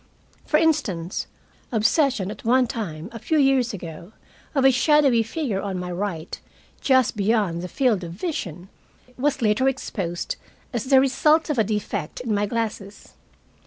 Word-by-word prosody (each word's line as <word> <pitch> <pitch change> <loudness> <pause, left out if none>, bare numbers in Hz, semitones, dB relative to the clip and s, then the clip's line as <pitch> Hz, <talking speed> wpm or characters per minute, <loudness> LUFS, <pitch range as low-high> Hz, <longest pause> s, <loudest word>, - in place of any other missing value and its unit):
For 305 - +4
instance, 225 - 0 0.4
obsession 225 - +2
at - - -10
one 250 +2 +4
time 180 -9 -5
a 230 - -8
few 315 +8 0
years 270 -4 +3
ago 170 0 -8 0.4
of 270 -1 +3
a 270 - +8
shadowy 275 -2 +4
figure 225 -3 -2
on 195 -2 -3
my 180 0 -4
right, 175 -3 -4 0.4
just 260 -3 +3
beyond 205 -5 +1
the 180 - -4
field 220 -2 +1
of 170 -1 -6
vision, 180 - -5 0.5
was 275 -1 0
later 215 +5 +3
exposed 185 -10 -4 0.4
as 235 -3 -2
the 265 0 +6
result 300 +4 +3
of 270 - -1
a - - +5
defect 210 -6 -3
in 240 -3 -2
my 205 0 +1
glasses. 210 -3 -4
225 Hz, 155 wpm, -23 LUFS, 190-265 Hz, 0.5 s, a